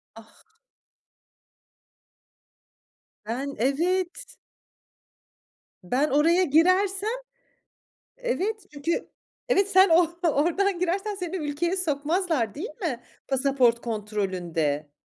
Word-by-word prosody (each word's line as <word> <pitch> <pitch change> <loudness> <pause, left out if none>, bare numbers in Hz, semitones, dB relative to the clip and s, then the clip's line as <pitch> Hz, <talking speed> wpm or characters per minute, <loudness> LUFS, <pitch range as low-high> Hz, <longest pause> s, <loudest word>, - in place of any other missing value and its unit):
Ah! 225 - -18 2.7
Ben, 265 +6 -4
evet. 350 - -1 1.5
Ben 255 +11 +1
oraya 330 +6 +4
girersem, 370 +6 +3 1.1
evet 440 -3 -2
çünkü 295 +4 -2 0.4
evet 400 -4 +3
sen 380 +1 +6
o 335 0 +4 0.2
oradan 345 +5 +1
girersen 385 +4 -1
seni 360 -1 -5
ülkeye 310 +4 -1
sokmazlar 310 - 0
değil 370 +11 -6
mi 260 -9 -3 0.2
pasaport 265 -3 +2
kontrolünde? 180 -9 -2
320 Hz, 80 wpm, -26 LUFS, 250-370 Hz, 2.7 s, sen